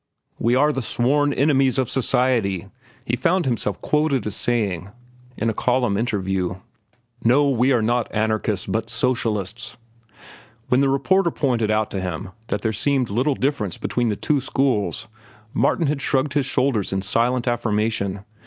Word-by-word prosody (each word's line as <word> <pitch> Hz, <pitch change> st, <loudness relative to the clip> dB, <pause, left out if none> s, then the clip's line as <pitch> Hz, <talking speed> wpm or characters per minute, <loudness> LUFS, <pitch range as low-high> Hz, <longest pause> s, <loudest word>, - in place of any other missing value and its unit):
"We 120 Hz, +2 st, +2 dB
are 150 Hz, +3 st, +3 dB
the 135 Hz, -, -2 dB
sworn 140 Hz, +5 st, +1 dB
enemies 135 Hz, -2 st, +2 dB
of 130 Hz, -2 st, +1 dB
society," 115 Hz, -8 st, +1 dB, 0.4 s
he 120 Hz, -, 0 dB
found 175 Hz, +7 st, +1 dB
himself 115 Hz, -5 st, -1 dB
quoted 150 Hz, -3 st, +1 dB
as 105 Hz, -, -3 dB
saying 100 Hz, -7 st, -1 dB, 0.5 s
in 115 Hz, -, -1 dB
a 110 Hz, -, +1 dB
column 125 Hz, -1 st, +1 dB
interview. 95 Hz, -5 st, -1 dB, 0.7 s
"No, 135 Hz, +5 st, +4 dB
we 125 Hz, +1 st, +2 dB
are 120 Hz, -4 st, +2 dB
not 120 Hz, +1 st, 0 dB
anarchists 110 Hz, -2 st, 0 dB
but 115 Hz, +1 st, -2 dB
socialists." 115 Hz, -3 st, -1 dB, 0.9 s
When 125 Hz, -, +4 dB
the 140 Hz, -, +3 dB
reporter 170 Hz, +7 st, +2 dB
pointed 120 Hz, -9 st, 0 dB
out 110 Hz, 0 st, +1 dB
to 95 Hz, -, -3 dB
him 90 Hz, +1 st, -5 dB, 0.2 s
that 105 Hz, -2 st, -3 dB
there 110 Hz, -, 0 dB
seemed 130 Hz, 0 st, 0 dB
little 130 Hz, +7 st, +1 dB
difference 130 Hz, -, -1 dB
between 120 Hz, -2 st, -1 dB
the 105 Hz, -, 0 dB
two 145 Hz, +6 st, 0 dB
schools, 130 Hz, -5 st, 0 dB, 0.5 s
Martin 170 Hz, -, +2 dB
had 145 Hz, -1 st, -1 dB
shrugged 135 Hz, 0 st, 0 dB
his 140 Hz, -2 st, +1 dB
shoulders 130 Hz, -7 st, 0 dB
in 95 Hz, 0 st, -1 dB
silent 120 Hz, +5 st, +1 dB
affirmation. 105 Hz, -4 st, -1 dB
120 Hz, 155 wpm, -22 LUFS, 105-135 Hz, 0.9 s, No